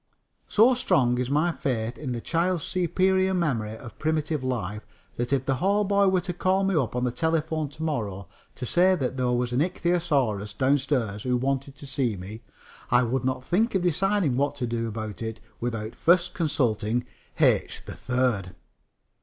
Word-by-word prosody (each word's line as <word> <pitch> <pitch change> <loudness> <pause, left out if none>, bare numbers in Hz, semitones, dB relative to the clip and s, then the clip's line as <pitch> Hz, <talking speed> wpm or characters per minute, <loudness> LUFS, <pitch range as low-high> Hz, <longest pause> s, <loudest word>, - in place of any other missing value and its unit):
So 230 +5 +5
strong 125 - +2
is 125 0 -1
my 155 +5 +2
faith 120 -6 -2
in 135 -3 -5
the 120 -1 -3
child's 170 +2 0
superior 190 +1 +1
memory 115 -11 -1
of 115 0 -12
primitive 155 -2 -1
life 105 -5 -2 0.4
that 120 +2 -2
if 135 -2 +1
the 135 -1 +1
hallboy 200 +3 +3
were 185 -1 +2
to 180 - -4
call 185 +2 +1
me 195 -1 +1
up 130 -7 0
on 125 - 0
the 125 - +1
telephone 160 0 -1
to 155 +3 -8
morrow 105 - -3 0.3
to - - -5
say 185 +8 +4
that 130 -6 -2
there 125 -1 0
was 125 0 0
an 125 - +2
ichthyosaurus 140 - 0
downstairs 130 -6 +1
who 125 +1 +1
wanted 135 +2 -2
to 145 - -10
see 130 -6 -1
me, 100 +5 -8 0.5
I 120 +1 +4
would 125 +2 -1
not 130 0 -1
think 205 - +1
of 185 - +1
deciding 180 -4 +1
what 145 +1 +1
to 130 -3 -2
do 115 -1 -2
about 110 -1 -5
it 115 0 -4 0.2
without 115 -2 -3
first 175 +1 +3
consulting 120 - 0 0.3
H. - - +2
3rd. 120 -8 -1
135 Hz, 175 wpm, -26 LUFS, 120-170 Hz, 0.5 s, So